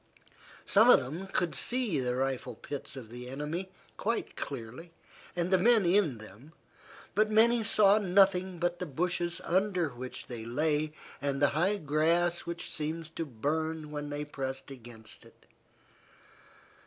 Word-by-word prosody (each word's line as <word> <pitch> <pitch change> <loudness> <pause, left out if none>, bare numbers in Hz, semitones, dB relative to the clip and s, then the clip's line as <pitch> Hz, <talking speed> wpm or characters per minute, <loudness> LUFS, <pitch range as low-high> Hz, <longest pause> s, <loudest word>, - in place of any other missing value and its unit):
Some 220 +4 +5
of - - +9
them 155 +9 -5
could 175 -4 0
see 235 - 0
the 125 -1 -1
rifle 130 -2 -2
pits 140 +3 -6
of 120 -5 -9
the 125 +1 -7
enemy 150 +7 -4 0.3
quite 230 +3 -2
clearly 135 +6 -7 0.4
and 175 +1 0
the 185 - +5
men 225 0 +5
in 175 - +3
them, 110 +8 -13 0.6
but 215 +1 +3
many 225 +2 +4
saw 210 -1 +5
nothing 190 -1 +3
but 175 0 -1
the 180 - -3
bushes 175 +3 -1
under 185 -2 +1
which 125 0 -8
they 120 -3 -7
lay, 150 +5 0 0.3
and 140 -1 -1
the 145 0 +4
high 180 +8 +1
grass 170 +2 +1
which 170 0 -5
seemed 160 0 -4
to 165 - -2
burn 155 +5 -2
when 145 -1 -4
they 145 0 -3
pressed 135 -1 -5
against 120 -4 -9
it. - - -20
160 Hz, 150 wpm, -30 LUFS, 135-180 Hz, 0.6 s, of